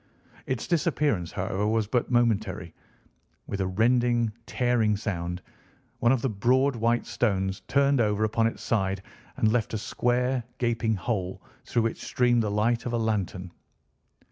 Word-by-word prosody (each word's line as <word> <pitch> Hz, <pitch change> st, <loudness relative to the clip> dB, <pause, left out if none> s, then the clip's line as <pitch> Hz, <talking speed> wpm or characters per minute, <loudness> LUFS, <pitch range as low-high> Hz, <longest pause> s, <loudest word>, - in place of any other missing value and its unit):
Its 130 Hz, -3 st, -2 dB
disappearance, 145 Hz, -, 0 dB
however, 95 Hz, +2 st, -1 dB
was 110 Hz, 0 st, +1 dB
but 120 Hz, +3 st, 0 dB
momentary. 110 Hz, -8 st, 0 dB, 0.7 s
With 100 Hz, -, -3 dB
a 95 Hz, -, 0 dB
rending, 120 Hz, +3 st, +2 dB, 0.2 s
tearing 120 Hz, -4 st, +1 dB
sound, 90 Hz, -4 st, -4 dB, 0.6 s
one 120 Hz, -, +4 dB
of 130 Hz, -3 st, +1 dB
the 135 Hz, -, +1 dB
broad, 125 Hz, +6 st, +2 dB
white 115 Hz, +1 st, +1 dB
stones 95 Hz, -4 st, 0 dB
turned 140 Hz, -2 st, +3 dB
over 105 Hz, -1 st, +1 dB
upon 115 Hz, +1 st, +2 dB
its 115 Hz, -, -5 dB
side 95 Hz, -3 st, 0 dB, 0.3 s
and 110 Hz, -, +3 dB
left 115 Hz, -2 st, 0 dB
a -, -, 0 dB
square, 125 Hz, +3 st, 0 dB
gaping 115 Hz, -2 st, 0 dB
hole, 95 Hz, -1 st, -3 dB, 0.2 s
through 120 Hz, -, +1 dB
which 115 Hz, -, -2 dB
streamed 120 Hz, -1 st, +2 dB
the 105 Hz, -, -1 dB
light 115 Hz, +4 st, +1 dB
of 120 Hz, -, -3 dB
a -, -, +2 dB
lantern. 100 Hz, -5 st, -2 dB
115 Hz, 150 wpm, -27 LUFS, 100-120 Hz, 0.7 s, one